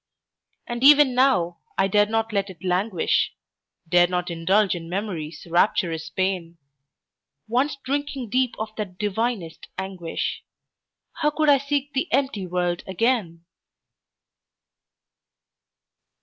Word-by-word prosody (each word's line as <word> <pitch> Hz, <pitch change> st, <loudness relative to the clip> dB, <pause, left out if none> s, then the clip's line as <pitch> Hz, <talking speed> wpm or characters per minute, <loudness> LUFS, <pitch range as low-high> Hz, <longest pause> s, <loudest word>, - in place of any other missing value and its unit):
And 240 Hz, +1 st, -4 dB
even 290 Hz, -2 st, +7 dB
now, 180 Hz, -10 st, +2 dB, 0.2 s
I 195 Hz, -, +3 dB
dare 205 Hz, +2 st, +3 dB
not 225 Hz, 0 st, -1 dB
let 200 Hz, -1 st, 0 dB
it 180 Hz, -2 st, -12 dB
languish, 185 Hz, 0 st, +1 dB, 0.5 s
Dare 175 Hz, +1 st, +5 dB
not 180 Hz, 0 st, -2 dB
indulge 190 Hz, +5 st, +2 dB
in 165 Hz, -2 st, -6 dB
Memory's 175 Hz, -5 st, -4 dB
rapturous 165 Hz, -2 st, +1 dB
pain; 180 Hz, -2 st, -2 dB, 0.9 s
Once 255 Hz, +6 st, +1 dB
drinking 275 Hz, -4 st, -3 dB
deep 255 Hz, 0 st, +1 dB
of 220 Hz, 0 st, -5 dB
that 195 Hz, -4 st, -5 dB
divinest 210 Hz, -4 st, -2 dB
anguish, 190 Hz, -3 st, -4 dB, 0.7 s
How 300 Hz, -2 st, +2 dB
could 305 Hz, 0 st, +1 dB
I 280 Hz, -1 st, +6 dB
seek 285 Hz, +1 st, -2 dB
the 280 Hz, +5 st, -1 dB
empty 265 Hz, -9 st, 0 dB
world 175 Hz, -1 st, -1 dB
again? 190 Hz, -5 st, 0 dB
200 Hz, 115 wpm, -24 LUFS, 175-255 Hz, 0.9 s, even